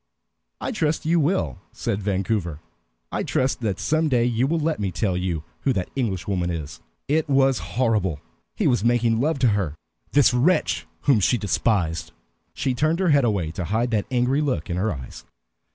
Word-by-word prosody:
"I - - -3
trust 160 -10 -1
you 170 +2 +3
will," 150 - 0
said 100 - -3
Vancouver. 95 -5 -1 0.5
"I - - -1
trust 130 0 0
that 100 -5 -1
some 155 0 +1
day 120 -3 +3
you 120 +2 +1
will 165 +3 +1
let 160 -3 0
me 100 -2 -1
tell 90 +2 -1
you 90 -4 -2 0.2
who 135 - +1
that 95 -5 -3
Englishwoman 95 -7 -1
is." 80 -4 -5 0.3
It 155 +1 +1
was 135 -1 +3 0.2
horrible; 105 - +1 0.4
he - - -1
was 120 -5 +2
making 120 -1 +2
love 155 +2 +1
to 130 -3 +3
her, 95 -8 -1 0.4
this 145 -3 +5
wretch, 145 +10 +2
whom 135 -6 +4
she 95 +5 +3
despised. 100 -5 0 0.4
She 130 - 0
turned 155 +6 +1
her 185 -1 +1
head 140 -4 +4
away 95 -8 0
to 90 +1 -4
hide 115 +6 0
the 105 -2 +1
angry 130 +3 +1
look 130 - -1
in 85 - -1
her 105 +4 0
eyes. 65 -4 -8
115 Hz, 185 wpm, -23 LUFS, 95-135 Hz, 0.5 s, this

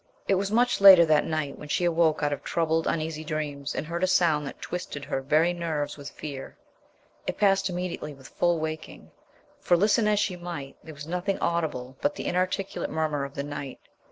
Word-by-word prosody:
It - - +3
was 195 +1 0
much 240 +1 +2
later 190 -4 +10
than 155 -1 +2
night 155 -3 -2
when 150 - -9
she 175 - +1
awoke 165 -3 +2
out 145 0 +1
of - - -6
troubled, 165 -1 0
uneasy 155 -1 -2
dreams 145 -2 -4
and - - -2
heard 170 +3 -3
a - - +4
sound 165 -5 +2
that - - -8
twisted 145 -5 -5
her 135 - -2
very 155 +6 +3
nerves 160 -4 -3
with 145 -1 -8
fear. 140 -3 -8 0.7
It - - -2
passed 195 -2 +3
immediately 180 -4 -4
with 135 -1 -14
full 175 -1 +1
waking, 155 0 -6 0.5
for, 175 - +3
listen 210 +3 +3
as 210 -1 +3
she 195 -3 0
might, 170 -6 -7
there 160 -1 -10
was 145 +1 -8
nothing 180 +4 -2
audible 150 -7 -2
but 290 +1 +1
the - - -6
inarticulate 185 +2 -1
murmur 155 -3 -1
of 140 - -10
the 140 - -2
night. 145 -2 -6
160 Hz, 200 wpm, -27 LUFS, 145-180 Hz, 0.7 s, later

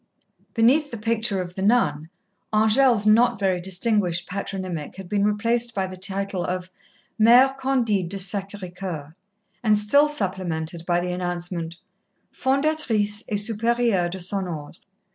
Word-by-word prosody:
Beneath 265 +6 +3
the 235 - -6
picture 220 -3 0
of 175 0 -10
the 190 - -6
nun, 165 -8 +1 0.4
Angèle's 220 +1 +3
not 220 +1 +4
very 190 -3 0
distinguished 185 -2 0
patronymic 185 -4 -5
had 190 -1 -9
been 200 +1 0
replaced 230 +3 0
by 190 -1 0
the 185 0 -7
title 195 0 -2
of 180 +1 -4 0.5
"Mère 250 +5 +6
Candide 240 -9 0
de 200 - -4
Sacré 195 -1 -3
Coeur," 165 -5 -6 0.5
and 215 -2 +4
still 285 +9 +3
supplemented 175 - -3
by 175 -1 +2
the 180 0 -3
announcement: 175 -1 -4 0.6
"Fondatrice 260 -7 +1
et 210 - -1
Supérieure 225 -3 +1
de 190 +2 -6
son 190 +1 -2
Ordre." 155 -1 -7
200 Hz, 140 wpm, -23 LUFS, 180-230 Hz, 0.6 s, Mère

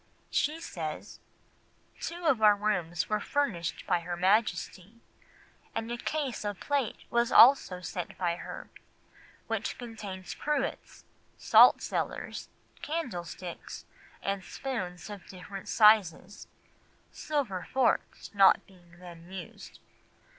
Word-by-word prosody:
She 305 +3 0
says, 160 - -6 0.8
"Two 345 +1 -5
of 270 -8 +3
our 210 -1 +7
rooms 180 -5 -1
were 215 0 0
furnished 205 - -2
by - - +2
her 175 +1 -5
Majesty, 195 +1 0 0.8
and 225 +1 -3
a 240 - -2
case 275 -3 -3
of 205 -2 -4
plate 280 -5 -1 0.2
was 235 0 +2
also 230 -8 +6
sent 180 0 -5
by 175 -2 -1
her, - - -8 0.7
which - - -3
contained 210 -6 -8
cruets, 290 -2 -3 0.3
saltcellars, - - +3 0.3
candle 260 - -3
sticks, 175 0 -8 0.4
and 195 -1 -2
spoons 185 -8 -5
of 205 -3 -10
different 190 +1 -9
sizes, 205 -3 +4 0.6
silver 250 -12 -3
forks 260 -3 0
not 195 -1 +5
being 175 -3 -20
then 175 0 -12
used. 190 -1 -9
205 Hz, 110 wpm, -29 LUFS, 180-240 Hz, 0.8 s, our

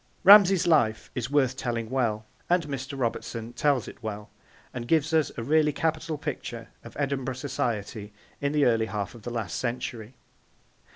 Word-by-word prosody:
Ramsay's 195 -2 +8
life 130 -10 +2
is 125 0 -3
worth 135 -3 +2
telling 120 -4 -3
well, 115 -5 0 0.2
and 175 0 +3
Mr. 140 -1 -5
Robertson 115 -1 -3
tells 135 0 +1
it - - -11
well, 105 -2 -6 0.4
and 120 -1 -5
gives 160 +2 +2
us 155 -3 +2
a 115 - -3
really 150 +3 +3
capital 160 +1 -2
picture 120 -6 -6
of 115 - -12
Edinburgh 135 -2 -1
society 115 -6 -3 0.3
in 140 0 0
the 150 -2 +3
early 115 -2 +2
half 100 -1 -4
of 120 - -13
the 120 - -6
last 110 -6 -3
century. 120 -1 -4
125 Hz, 165 wpm, -27 LUFS, 115-150 Hz, 0.4 s, Ramsay's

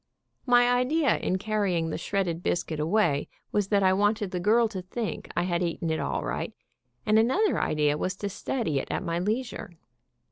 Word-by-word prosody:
My 245 0 +5
idea 250 +5 +2
in 185 - -1
carrying 190 -5 0
the - - -2
shredded 175 -3 -1
biscuit 165 -3 -1
away 160 -3 +1 0.2
was 205 -2 +1
that 200 -1 +2
I 185 0 +5
wanted 205 0 +1
the 180 - -2
girl 225 +5 +4
to 190 -4 -5
think 210 +5 -5
I 175 - +3
had 175 -1 0
eaten 170 -1 -1
it 160 - -1
all - - -2
right, - - -3 0.5
and 215 +1 +4
another 360 - +2
idea 150 -1 +1
was 185 - -1
to 200 +1 -4
study 200 - -2
it - - -5
at - - -2
my 170 0 -1
leisure. 215 -3 -3
195 Hz, 185 wpm, -27 LUFS, 170-220 Hz, 0.5 s, My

